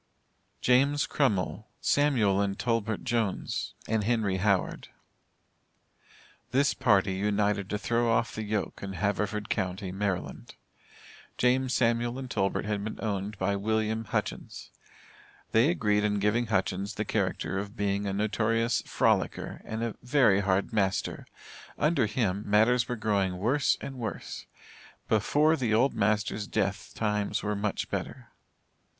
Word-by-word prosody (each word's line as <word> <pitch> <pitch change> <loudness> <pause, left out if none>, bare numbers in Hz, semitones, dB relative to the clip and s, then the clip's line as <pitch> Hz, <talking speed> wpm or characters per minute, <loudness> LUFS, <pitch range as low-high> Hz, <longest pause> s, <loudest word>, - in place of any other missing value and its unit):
JAMES 140 +3 +3
CRUMMILL, 110 -5 0
SAMUAL 115 -10 +2
and 100 -1 -1
TOLBERT 115 -3 -1
JONES 115 -6 -2
and 110 -1 +1
HENRY 110 -4 +1
HOWARD. 95 -1 0 1.6
This 140 +2 +2
party 100 -4 +3
united 100 0 0
to 105 - -1
throw 115 +2 +1
off 115 0 +1
the 110 - -4
yoke 105 -1 -3
in 100 -1 -5
Haverford 105 +1 -1
county, 95 0 -2
Md. 95 -9 -3 0.8
James, 125 +1 +2
Samuel 120 0 +1
and 130 -2 -6
Tolbert 95 +1 0
had 105 -1 -2
been 110 - -5
owned 100 -1 -3
by 95 +2 0
William 110 +2 -1
Hutchins. - - -4 0.8
They 115 +7 +4
agreed 105 -11 +1
in 105 -1 +1
giving 105 +4 +1
Hutchins 95 -1 -1
the - - -2
character 95 - -1
of 100 +1 -7
being 100 0 0
a 95 - -1
notorious 110 +3 +1
"frolicker," - - 0
and 110 +1 -4
a 115 -2 -3
"very 125 -6 +4
hard 100 +2 0
master." 95 -3 -1 0.5
Under 150 -6 +2
him, 105 -3 0
matters 115 +4 +4
were 125 - -1
growing 100 -5 0
"worse 130 +8 +2
and 135 -2 -7
worse." 115 - -5 0.6
Before 150 +9 +3
the 120 -7 +1
old 130 +5 +3
master's 105 0 0
death 100 +2 -2
times 105 -2 -1
were 105 0 -1
much 100 0 -2
better. - - -5
105 Hz, 135 wpm, -28 LUFS, 100-120 Hz, 1.6 s, They